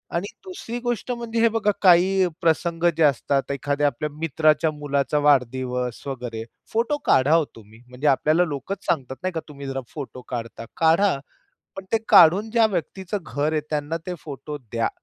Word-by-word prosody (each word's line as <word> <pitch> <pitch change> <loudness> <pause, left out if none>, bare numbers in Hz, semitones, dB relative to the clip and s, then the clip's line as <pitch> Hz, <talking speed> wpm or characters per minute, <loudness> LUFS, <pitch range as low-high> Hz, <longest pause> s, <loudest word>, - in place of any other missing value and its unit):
आणि 175 +4 -1 0.2
दुसरी 245 -11 -6
गोष्ट 240 +1 -2
म्हणजे 235 -1 -3
हे 230 - +6
बघा 220 -2 +1
काही 185 +1 +5
प्रसंग 165 +1 0
जे 165 - +3
असतात, 140 -1 +1
एखाद्या 145 +1 0
आपल्या 150 +1 -2
मित्राच्या 155 +1 +1
मुलाचा 145 -1 -1
वाढदिवस 125 -3 +1
वगैरे. 120 -4 -5 0.3
फोटो 235 +6 +1
काढा 135 +4 +4
हो 165 -2 +3
तुम्ही. 110 +1 -16
म्हणजे 125 +4 -3
आपल्याला 155 +5 +3
लोकच 160 +6 -5
सांगतात 135 -5 -1
नाही 185 0 -1
का 165 - -2
तुम्ही 140 -1 -8
जरा 135 0 -3
फोटो 135 -4 -7
काढता. 115 -1 -5
काढा, 165 +2 +3 0.6
पण 195 - -7
ते 225 - +4
काढून 195 +7 +6
ज्या 230 0 +4
व्यक्तीच 190 0 -4
घर 155 -5 -2
आहे 155 - +1
त्यांना 150 +1 -2
ते 180 - -3
फोटो 145 0 -7
द्या. 115 -3 -2
155 Hz, 170 wpm, -23 LUFS, 135-185 Hz, 0.6 s, हे